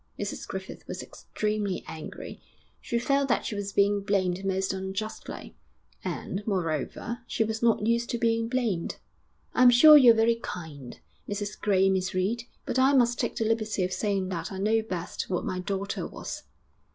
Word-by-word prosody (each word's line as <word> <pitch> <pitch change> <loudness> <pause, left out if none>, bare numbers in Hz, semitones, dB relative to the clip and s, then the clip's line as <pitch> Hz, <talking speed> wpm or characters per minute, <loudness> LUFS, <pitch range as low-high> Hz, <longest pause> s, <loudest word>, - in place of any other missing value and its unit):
Mrs - - -4
Griffith - - -7
was - - -5
extremely 210 -3 -3
angry; 160 - -8 0.4
she 235 - -2
felt 275 +3 +1
that - - +1
she - - -3
was 205 -1 -4
being 200 +1 +3
blamed 190 -2 0
most 190 0 0
unjustly, 190 +3 -5 0.5
and, 195 - -4
moreover, 185 - -2
she - - +1
was 220 0 -3
not 230 -3 +3
used 235 +1 +1
to 235 - -1
being 230 0 +1
blamed. 235 -9 -1 0.6
'I'm 250 0 +7
sure 300 +6 +9
you're 250 -6 +8
very 230 +1 +3
kind, 145 - -7 0.3
Mrs 205 0 -4
Gray 195 -2 +3
and 195 - +4
Miss 185 -1 -1
Reed, 220 +6 0 0.2
but 260 - -1
I 265 +2 +5
must 240 -3 +3
take - - -1
the 225 - -1
liberty 215 -3 0
of 185 +1 -1
saying 195 -3 -1
that 180 +3 -4
I 190 - -5
know 215 +3 +2
best 185 -6 -5
what 180 - -1
my 185 - -2
daughter 195 +1 -3
was.' - - -7
205 Hz, 175 wpm, -27 LUFS, 190-230 Hz, 0.6 s, sure